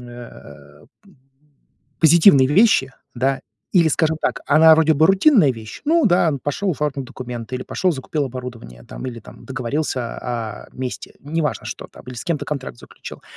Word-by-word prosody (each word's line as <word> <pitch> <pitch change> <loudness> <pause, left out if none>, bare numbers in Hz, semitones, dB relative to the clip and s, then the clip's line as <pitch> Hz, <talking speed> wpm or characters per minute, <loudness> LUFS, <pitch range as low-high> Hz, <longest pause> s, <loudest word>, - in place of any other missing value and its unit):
э 75 - -13 0.2
п 200 - -21 0.9
Позитивные 160 -4 +6
вещи, 145 - +3 0.2
да, 135 +2 0 0.3
или, 170 -3 +4
скажем 160 0 +1
так, - - -1
она 160 +2 +7
вроде 160 0 +3
бы 155 +3 +4
рутинная 195 - +4
вещь, 110 -2 -10
ну 330 +2 +3
да, 175 -2 +3
пошел 185 +7 -2
оформил 145 -3 -3
документы, 125 -1 -7
или 130 - -4
пошел, 185 -2 0
закупил 145 +2 -3
оборудование, 120 - -8
там, - - -9
или 120 -2 -7
там, - - -15
договорился, 130 -1 -3
а, 115 -3 -5
о - - -20
месте, 130 -1 -6
неважно, 150 -6 -3
что - - -7
там, - - -15
или 125 - -8
с 120 - -7
кем-то 165 -4 -2
контракт 95 - -5
заключил. - - -12
135 Hz, 165 wpm, -20 LUFS, 120-160 Hz, 0.9 s, она